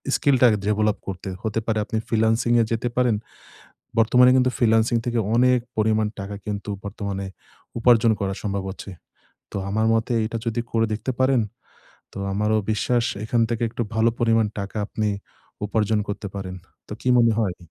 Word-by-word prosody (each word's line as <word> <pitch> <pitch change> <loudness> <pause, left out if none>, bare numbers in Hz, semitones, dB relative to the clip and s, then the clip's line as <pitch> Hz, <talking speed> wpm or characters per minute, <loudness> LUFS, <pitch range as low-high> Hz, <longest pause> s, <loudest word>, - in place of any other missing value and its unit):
স্কিলটা 130 -3 +4
আগে 105 - +2
ডেভেলাপ 105 0 +1
করতে। 95 0 -5
হতে 110 0 -1
পারে 110 -1 +1
আপনি 110 - -3
ফ্রিল্যান্সিং 115 +1 +2
এ - - +4
যেতে 115 +1 0
পারেন। 125 -3 +3 0.8
বর্তমানে 125 +3 +6
কিন্তু 130 0 +3
ফ্রিল্যান্সিং 115 0 +3
থেকে 120 -1 0 0.2
অনেক 125 +1 +4 0.2
পরিমাণ 110 0 +2
টাকা 100 +1 -5
কিন্তু 105 0 -4
বর্তমানে 100 -1 -4 0.5
উপার্জন 115 -1 +5
করা 95 -1 -1
সম্ভব 100 -2 -2
হচ্ছে। 100 +1 -9 0.6
তো - - -4
আমার 110 +2 +1
মতে 115 +2 0
এটা 115 +1 -3
যদি 115 +1 0
করে 115 0 +2
দেখতে 110 +4 -2
পারেন, 130 -2 +3 0.7
তো - - -8
আমারও 105 +2 +1
বিশ্বাস 120 +3 +1 0.2
এখান 115 +2 +1
থেকে 115 0 -2
একটু 120 - -3
ভালো 110 +1 +3
পরিমাণ 115 -2 +3
টাকা 100 +2 -5
আপনি 110 0 -2 0.6
উপার্জন 105 0 +1
করতে 100 0 -4
পারেন। 95 -2 -5 0.3
তো - - -7
কি - - -1
মনে 115 -1 +5
হয়? 95 -5 -1
110 Hz, 165 wpm, -23 LUFS, 105-120 Hz, 0.8 s, বর্তমানে